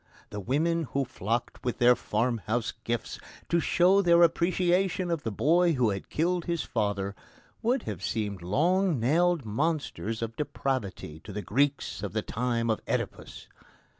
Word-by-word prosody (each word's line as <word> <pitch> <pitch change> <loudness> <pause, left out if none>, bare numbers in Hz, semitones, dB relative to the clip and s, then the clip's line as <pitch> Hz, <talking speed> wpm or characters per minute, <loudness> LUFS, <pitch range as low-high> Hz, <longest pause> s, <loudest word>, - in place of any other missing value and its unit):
The 105 - -5
women 160 - 0
who 140 0 +1
flocked 115 +1 -3
with 125 - -2
their 125 0 +6
farmhouse 115 0 -1
gifts 120 -1 -3 0.3
to 170 - +3
show 185 +4 +4
their 170 -2 +5
appreciation 180 +2 +2
of 165 -3 -1
the 115 - -3
boy 170 - +3
who 125 -6 +2
had 100 -1 -5
killed 175 +2 0
his 170 -1 -1
father 100 -3 -1 0.5
would 245 +2 +1
have - - -5
seemed 100 -4 -2
long 165 - +2
nailed 165 +5 +2
monsters 115 - -2
of 115 0 -5
depravity 130 - -3
to 105 - -10
the 105 +1 -5
Greeks 140 +9 0
of - - -4
the - - -1
time 115 -1 -1
of 110 - -2
Oedipus. - - -4
135 Hz, 155 wpm, -28 LUFS, 110-170 Hz, 0.5 s, their